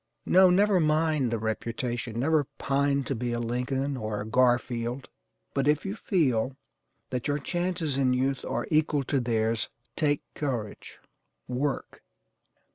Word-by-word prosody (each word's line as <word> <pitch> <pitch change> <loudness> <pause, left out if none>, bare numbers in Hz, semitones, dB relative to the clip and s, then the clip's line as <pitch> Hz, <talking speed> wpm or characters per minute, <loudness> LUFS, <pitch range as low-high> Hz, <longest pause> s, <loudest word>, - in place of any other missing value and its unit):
No, 185 0 +6
never 195 +1 +4
mind 155 -4 +2
the 115 - 0
reputation; 115 +1 -3
never 150 +1 +2
pine 140 0 +1
to 135 - -2
be 120 -1 -2
a 120 - -1
Lincoln, 125 +4 -1
or 110 -4 -3
a 105 - -4
Garfield, 120 +1 +1 0.4
but 140 0 0
if 150 +3 +2
you 195 +2 -3
feel 135 - +1 0.5
that 125 -2 -2
your 145 0 +1
chances 170 -2 -1
in 130 -2 +3
youth 130 +1 0
are - - -2
equal 150 -2 +2
to 135 +1 0
theirs, 115 -2 0 0.3
take 145 -2 +1
courage 120 -8 -4 0.5
WORK. 135 +3 -2
135 Hz, 140 wpm, -28 LUFS, 120-150 Hz, 0.5 s, No